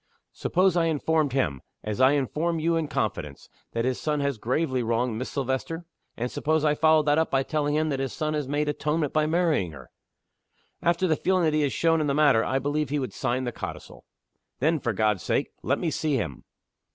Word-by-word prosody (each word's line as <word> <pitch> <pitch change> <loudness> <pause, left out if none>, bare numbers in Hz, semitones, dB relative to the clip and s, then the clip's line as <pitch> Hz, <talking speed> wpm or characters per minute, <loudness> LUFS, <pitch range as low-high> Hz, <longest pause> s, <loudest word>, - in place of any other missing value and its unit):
"Suppose 185 0 +2
I 170 -1 +3
informed 160 -2 +1
him 75 - 0 0.2
as 105 +2 -2
I 130 +2 +6
inform 150 +5 0
you 165 +1 +1
in 165 -2 0
confidence 90 - -3 0.2
that 115 +1 0
his 130 -1 -1
son 150 -1 0
has 140 -4 -1
gravely 130 +3 0
wronged 115 0 0
Miss 130 - -4
Silvester? 140 +5 -3 0.3
And 120 +2 -2
suppose 155 0 0
I 150 - +4
followed 155 0 +4
that 145 +1 +3
up 160 - +1
by 135 0 +2
telling 145 0 -1
him 155 +1 +1
that 135 -2 -1
his 135 -2 -2
son 155 0 -2
has 150 -3 -2
made 145 +2 0
atonement 150 0 -1
by 155 -1 +2
marrying 155 - +1
her?" - - -12 0.9
"After 170 +2 +2
the 160 - +3
feeling 185 +3 +1
that 155 -2 +2
he 155 - +2
has 145 -2 +1
shown 165 -1 +2
in 150 - 0
the 140 - +1
matter, 145 -7 +4
I 130 - 0
believe 145 +1 -1
he 150 - 0
would 130 -3 -3
sign 130 0 -1
the 120 - -2
codicil." - - -8 0.5
"Then, 160 +4 +1
for 120 -3 -1
God's 105 -2 +1
sake, - - -1
let - - +1
me 165 - -1
see 150 -2 0
him!" 75 - -3
145 Hz, 215 wpm, -26 LUFS, 130-155 Hz, 0.9 s, I